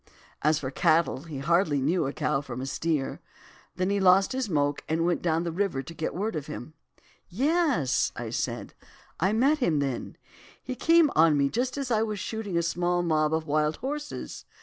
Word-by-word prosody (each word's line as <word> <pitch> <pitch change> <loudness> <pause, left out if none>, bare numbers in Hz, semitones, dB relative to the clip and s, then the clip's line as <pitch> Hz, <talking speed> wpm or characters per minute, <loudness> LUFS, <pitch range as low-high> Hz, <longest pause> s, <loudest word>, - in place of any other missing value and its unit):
As 155 +1 +3
for 135 -3 -4
cattle, 160 -1 +2
he 155 -4 -7
hardly 155 +1 +2
knew 150 +3 +1
a - - -2
cow 140 -1 -1
from 125 -3 -7
a 130 - -4
steer. 150 0 -2 0.5
Then 185 +2 0
he 200 - +1
lost 190 0 +5
his 255 -4 -2
moke 145 -3 0
and 165 +1 +1
went 175 -1 +1
down 165 -1 +1
the 170 - -2
river 170 -6 -1
to 165 - -9
get 160 -1 -4
word 210 +3 -2
of 150 -2 -4
him.' 150 0 -7 0.6
"'Yes!' 270 - +1
I - - -5
said. - - -3 0.5
'I 190 +5 +2
met 270 +7 +3
him 170 - +2
then; 135 -4 -3 0.5
he - - -4
came 330 +2 +4
on 160 -2 +5
me 140 -1 +2
just 250 - -2
as 275 -3 -3
I 220 -2 +3
was 215 -2 -2
shooting 205 -2 -3
a 170 - +2
small 175 +1 0
mob 155 -2 +1
of 160 0 -1
wild 150 0 +1
horses. 295 +3 -6
170 Hz, 195 wpm, -27 LUFS, 150-210 Hz, 0.6 s, lost